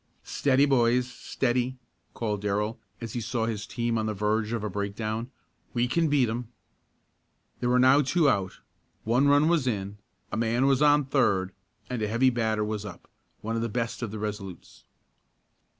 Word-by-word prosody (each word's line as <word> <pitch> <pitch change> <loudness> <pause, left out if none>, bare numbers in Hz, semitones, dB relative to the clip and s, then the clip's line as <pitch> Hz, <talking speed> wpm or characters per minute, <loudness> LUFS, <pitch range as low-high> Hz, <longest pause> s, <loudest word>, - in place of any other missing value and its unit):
"Steady, 140 0 +2
boys! 125 -2 +3
Steady!" 125 0 -2 0.4
called 105 -3 -2
Darrell, 105 +2 -1 0.2
as 115 -3 -6
he 120 - -2
saw 115 0 -1
his 105 -2 -4
team 115 -1 -1
on 110 - -1
the 110 - -2
verge 105 +2 0
of 115 -3 -2
a - - -1
breakdown. 110 +4 -3 0.5
"We 120 0 +2
can 165 +6 +1
beat 140 -4 +3
'em!" 115 +2 -3 1.1
There 120 - 0
were 125 - +4
now 130 +3 +6
two 150 +3 +2
out, 95 -7 0 0.4
one 125 +5 +3
run 145 +2 +5
was 165 -6 +2
in, 100 -3 -3 0.3
a - - -2
man 115 +3 +1
was 135 -1 +3
on 145 -1 +5
third 100 -9 +1 0.4
and 125 -3 -4
a 105 - 0
heavy 120 +4 +3
batter 110 -3 0
was 105 -1 -3
up 100 -4 -10 0.3
one 115 +1 -3
of 115 - -1
the 115 - -1
best 115 +2 -3
of 120 - -2
the 110 - -6
Resolutes. 105 -3 -7
115 Hz, 180 wpm, -27 LUFS, 105-130 Hz, 1.1 s, now